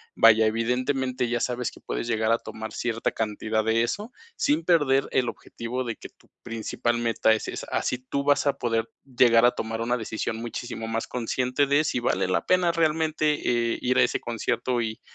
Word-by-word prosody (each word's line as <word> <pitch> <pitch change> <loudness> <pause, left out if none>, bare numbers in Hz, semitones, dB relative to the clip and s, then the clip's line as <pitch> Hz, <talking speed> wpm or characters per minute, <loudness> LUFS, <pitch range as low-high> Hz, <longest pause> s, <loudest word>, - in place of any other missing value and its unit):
vaya, 110 -1 +6
evidentemente 125 +3 0
ya 120 0 0
sabes 125 0 -2
que - - -15
puedes - - -4
llegar 110 -1 +1
a 115 - +4
tomar 110 -1 -8
cierta 115 -1 -1
cantidad 110 0 -1
de 110 +1 +2
eso, 205 - -3 0.2
sin 150 +3 +1
perder 145 -6 +3
el 125 -2 +1
objetivo 125 +2 -5
de 115 -2 -4
que - - -11
tu - - -28
principal 120 +1 -2
meta 115 -1 +2
es 110 - -2
esa. - - -5
Así 125 - 0
tú 130 +2 -3
vas 145 0 +3
a 140 - +3
poder 115 -1 0
llegar 120 -3 +4
a 120 - +6
tomar 115 -2 -4
una 120 +2 0
decisión 110 0 -3
muchísimo 115 -1 -5
más 115 0 -2
consciente 125 +3 0
de 140 +2 +3
si 125 - -1
vale 120 - 0
la 90 - 0
pena 180 -2 +3
realmente, 155 -7 +1
eh, - - -5
ir 125 +1 +1
a - - +6
ese - - 0
concierto 120 +1 -1
y 110 -1 -4
120 Hz, 195 wpm, -26 LUFS, 115-135 Hz, 0.2 s, vaya